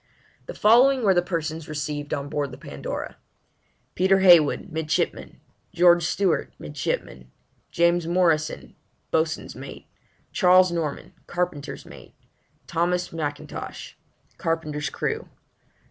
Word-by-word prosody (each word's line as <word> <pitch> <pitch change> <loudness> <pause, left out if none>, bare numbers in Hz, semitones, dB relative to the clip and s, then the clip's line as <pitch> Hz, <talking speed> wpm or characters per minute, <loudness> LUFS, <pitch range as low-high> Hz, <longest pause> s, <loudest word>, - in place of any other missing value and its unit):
The - - -7
following 250 +4 +5
were 195 -3 +5
the 175 - +3
persons 165 -3 -4
received 145 -1 -4
on 140 0 -2
Board 145 -1 -2
the 125 - -10
Pandora: - - -6 0.8
PETER 190 +1 +3
HEYWOOD 175 0 +5
Midshipman. 160 -1 -2 0.4
GEORGE 175 0 +6
STEWART 190 0 0
Ditto. 75 -3 -4 0.4
JAMES 170 0 +2
MORRISON 170 -3 0 0.4
Boatswain's 160 0 -1
mate. - - -10 0.5
CHARLES 185 -1 +5
NORMAN 160 -4 -4
Carpenter's 175 -5 -3
mate. - - -14 0.5
THOMAS 175 +1 -1
M'INTOSH 145 -3 -6 0.4
Carpenter's 155 -2 -2
crew. - - -3
165 Hz, 105 wpm, -24 LUFS, 150-180 Hz, 0.8 s, GEORGE